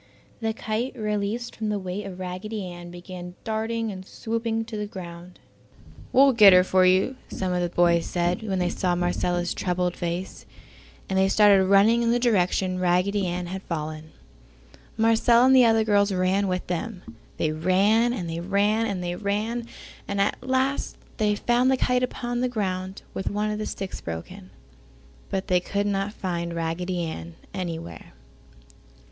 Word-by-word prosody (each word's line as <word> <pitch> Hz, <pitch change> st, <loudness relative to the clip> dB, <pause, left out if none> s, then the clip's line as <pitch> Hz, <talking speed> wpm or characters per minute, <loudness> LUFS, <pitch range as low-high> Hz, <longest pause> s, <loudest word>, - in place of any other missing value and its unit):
The 225 Hz, -2 st, -1 dB
kite, 225 Hz, +4 st, -3 dB
released 210 Hz, +2 st, -2 dB
from 220 Hz, -1 st, -3 dB
the 210 Hz, -, 0 dB
weight 195 Hz, +1 st, -5 dB
of 185 Hz, -1 st, -8 dB
Raggedy 185 Hz, +3 st, -5 dB
Ann 175 Hz, -1 st, -8 dB
began 175 Hz, 0 st, -9 dB
darting 225 Hz, 0 st, -2 dB
and 190 Hz, -1 st, -8 dB
swooping 225 Hz, +2 st, -3 dB
to 225 Hz, -, -7 dB
the 210 Hz, -1 st, -3 dB
ground. 175 Hz, -2 st, -9 dB, 0.7 s
"We'll 275 Hz, +1 st, +6 dB
get 210 Hz, -5 st, +8 dB
her 180 Hz, 0 st, +7 dB
for 185 Hz, 0 st, +4 dB
you!" 190 Hz, +8 st, +2 dB
some 185 Hz, -1 st, -2 dB
of 180 Hz, -, 0 dB
the 175 Hz, -, 0 dB
boys 170 Hz, -1 st, +2 dB
said 175 Hz, +2 st, 0 dB
when 200 Hz, -4 st, -2 dB
they 180 Hz, -1 st, +1 dB
saw 180 Hz, -2 st, 0 dB
Marcella's 175 Hz, 0 st, 0 dB
troubled 180 Hz, -1 st, -1 dB
face, 175 Hz, +2 st, -5 dB, 0.6 s
and 190 Hz, 0 st, 0 dB
they 190 Hz, -, +4 dB
started 200 Hz, -1 st, +5 dB
running 200 Hz, +5 st, +5 dB
in 235 Hz, -, +1 dB
the 240 Hz, -, +3 dB
direction 185 Hz, -5 st, +1 dB
Raggedy 180 Hz, +2 st, +1 dB
Ann 175 Hz, +1 st, -3 dB
had 190 Hz, +2 st, -5 dB
fallen. 155 Hz, -2 st, -5 dB, 0.9 s
Marcella 230 Hz, +2 st, +4 dB
and 265 Hz, 0 st, +6 dB
the 255 Hz, -2 st, +7 dB
other 225 Hz, -1 st, +4 dB
girls 205 Hz, -1 st, +3 dB
ran 190 Hz, +2 st, +1 dB
with 185 Hz, 0 st, -2 dB
them. 180 Hz, +2 st, -4 dB, 0.3 s
They 155 Hz, -, 0 dB
ran, 195 Hz, +9 st, +3 dB
and 195 Hz, -8 st, -3 dB
they 165 Hz, 0 st, -4 dB
ran, 205 Hz, +5 st, +1 dB
and 190 Hz, -4 st, -3 dB
they 175 Hz, 0 st, -2 dB
ran, 215 Hz, +4 st, -2 dB, 0.4 s
and 200 Hz, 0 st, -2 dB
at 200 Hz, -, +1 dB
last 260 Hz, +2 st, -1 dB, 0.2 s
they 210 Hz, -2 st, +2 dB
found 240 Hz, +4 st, +2 dB
the 265 Hz, -, +3 dB
kite 250 Hz, 0 st, +1 dB
upon 245 Hz, -1 st, -2 dB
the 255 Hz, -, +1 dB
ground 190 Hz, -4 st, -3 dB
with 190 Hz, -, -2 dB
one 210 Hz, +1 st, -1 dB
of 210 Hz, -, -3 dB
the 215 Hz, -, -3 dB
sticks 195 Hz, -1 st, -5 dB
broken, 180 Hz, -, -7 dB, 0.8 s
but 190 Hz, 0 st, -2 dB
they 180 Hz, -2 st, +3 dB
could 200 Hz, +3 st, -2 dB
not 200 Hz, 0 st, -1 dB
find 170 Hz, -4 st, -4 dB
Raggedy 170 Hz, +2 st, -2 dB
Ann 85 Hz, -, -6 dB, 0.2 s
anywhere. 165 Hz, -, -6 dB
195 Hz, 170 wpm, -25 LUFS, 180-220 Hz, 0.9 s, get